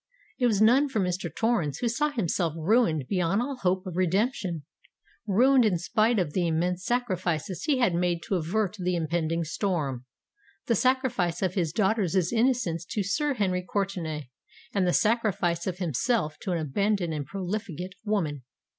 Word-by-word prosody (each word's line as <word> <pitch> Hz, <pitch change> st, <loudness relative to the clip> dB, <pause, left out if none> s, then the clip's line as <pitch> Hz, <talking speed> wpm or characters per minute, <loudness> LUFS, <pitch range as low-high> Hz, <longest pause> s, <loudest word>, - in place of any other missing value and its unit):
It 250 Hz, -, +4 dB
was 215 Hz, -2 st, +3 dB
none 265 Hz, +6 st, +5 dB
for 225 Hz, -, -1 dB
Mr. 180 Hz, -2 st, -1 dB
Torrens, 205 Hz, -, 0 dB
who 245 Hz, -, -1 dB
saw 295 Hz, +6 st, +1 dB
himself 180 Hz, -, -1 dB
ruined 165 Hz, -, +2 dB
beyond 185 Hz, +1 st, +1 dB
all 265 Hz, +2 st, -2 dB
hope 185 Hz, -3 st, 0 dB
of 180 Hz, -3 st, -6 dB
redemption,—ruined 200 Hz, -, 0 dB
in 205 Hz, -6 st, +2 dB
spite 215 Hz, +7 st, +1 dB
of 170 Hz, -7 st, 0 dB
the 180 Hz, -2 st, +1 dB
immense 175 Hz, +3 st, 0 dB
sacrifices 185 Hz, -, -1 dB
he 290 Hz, -3 st, +2 dB
had 235 Hz, -8 st, +2 dB
made 175 Hz, 0 st, 0 dB
to 230 Hz, -, -4 dB
avert 190 Hz, +4 st, 0 dB
the 180 Hz, 0 st, 0 dB
impending 165 Hz, 0 st, -1 dB
storm—the 155 Hz, -, -4 dB
sacrifice 240 Hz, -9 st, +1 dB
of 185 Hz, -1 st, 0 dB
his 170 Hz, -5 st, 0 dB
daughter's 195 Hz, -1 st, +1 dB, 0.2 s
innocence 230 Hz, -8 st, +1 dB
to 205 Hz, -, -2 dB
Sir 285 Hz, +9 st, 0 dB
Henry 185 Hz, -5 st, 0 dB
Courtenay, 175 Hz, -8 st, -3 dB, 0.4 s
and 195 Hz, -3 st, +2 dB
the -, -, +3 dB
sacrifice 205 Hz, -7 st, +1 dB
of 180 Hz, -1 st, -2 dB
himself 165 Hz, -, -1 dB
to 190 Hz, -, -4 dB
an 175 Hz, -, +1 dB
abandoned 175 Hz, +3 st, 0 dB
and 145 Hz, -3 st, -4 dB
profligate 190 Hz, -2 st, -4 dB
woman! 170 Hz, -10 st, -1 dB
185 Hz, 155 wpm, -27 LUFS, 170-220 Hz, 0.4 s, none